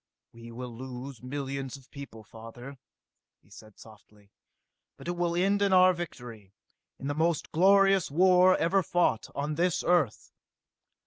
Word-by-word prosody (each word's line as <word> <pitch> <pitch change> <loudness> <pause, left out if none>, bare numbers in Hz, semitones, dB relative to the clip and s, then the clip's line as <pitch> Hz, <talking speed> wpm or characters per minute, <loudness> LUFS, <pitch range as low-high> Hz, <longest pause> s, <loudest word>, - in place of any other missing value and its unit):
"We 115 0 -12
will 120 0 -8
lose 130 +1 -8
millions 135 0 -5
of 135 -1 -21
people, 140 -6 -10
father," 120 +5 -12 0.6
he - - -27
said 110 0 -15
softly. 105 -2 -18 0.7
"But - - -11
it - - 0
will 175 -1 -1
end 195 +3 +1
in 200 -1 +2
our 185 0 +6
victory, 120 - -9 0.4
in - - -9
the 145 - -1
most 160 +1 -1
glorious 195 +1 +4
war 185 +4 +4
ever 190 +4 +2
fought 175 -9 0
on 145 +2 -2
this 175 +3 0
Earth!" 170 -10 0
140 Hz, 145 wpm, -28 LUFS, 120-175 Hz, 0.7 s, our